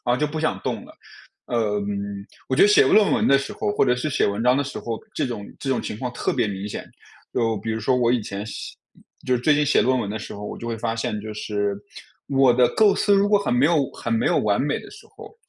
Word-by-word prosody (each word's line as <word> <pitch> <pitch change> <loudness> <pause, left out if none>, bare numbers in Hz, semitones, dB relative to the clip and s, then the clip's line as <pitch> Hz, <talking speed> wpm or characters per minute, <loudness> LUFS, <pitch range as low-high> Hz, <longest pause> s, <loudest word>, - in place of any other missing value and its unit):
然 120 0 +2
后 - - 0
就 150 - +1
不 155 +1 -4
想 155 - 0
动 - - -3
了。 - - -15 0.5
呃， 105 -4 0 0.7
我 130 - 0
觉 - - +4
得 205 - +8
写 210 - +5
论 210 -2 +5
文 - - +2
的 140 - +6
时 135 - -5
候， - - -3
或 - - +3
者 125 -2 +3
是 125 +5 -2
写 - - +1
文 100 +2 -1
章 125 +2 +4
的 140 - +1
时 140 - -6
候， 115 -1 -4 0.2
这 - - -1
种 105 -5 -5
这 135 - -4
种 130 - +1
情 105 - -6
况 125 -2 -3
特 - - -1
别 120 -4 0
明 100 -1 -5
显。 105 - -6 0.4
就 115 -2 0
比 110 +3 -4
如 110 - -2
说 130 - +1
我 125 -2 +2
以 120 -1 +2
前 100 0 -6
写 110 - -7 0.5
就 130 - +1
是 120 - -3
最 150 +4 +4
近 150 0 +2
写 145 - +4
论 130 0 +2
文 100 -4 -3
的 110 - -3
时 110 - -8
候， 105 +1 -7
我 - - -6
就 - - -8
会 115 -1 -3
发 115 0 -2
现， 105 -2 -2
就 110 +1 -7
是 105 -1 -2 0.5
我 135 -2 +4
的 125 0 +4
构 210 -2 +4
思 205 - +2
如 200 +1 +3
果 205 0 +4
很 200 - -1
没 125 +3 +4
有 150 -4 +2
很 115 - -4
没 115 - +1
有 - - +2
完 100 -1 +1
美 145 +1 -1
的 - - -12
时 425 +1 -14
候， 440 0 -13
125 Hz, 300 characters per minute, -23 LUFS, 110-145 Hz, 0.7 s, 得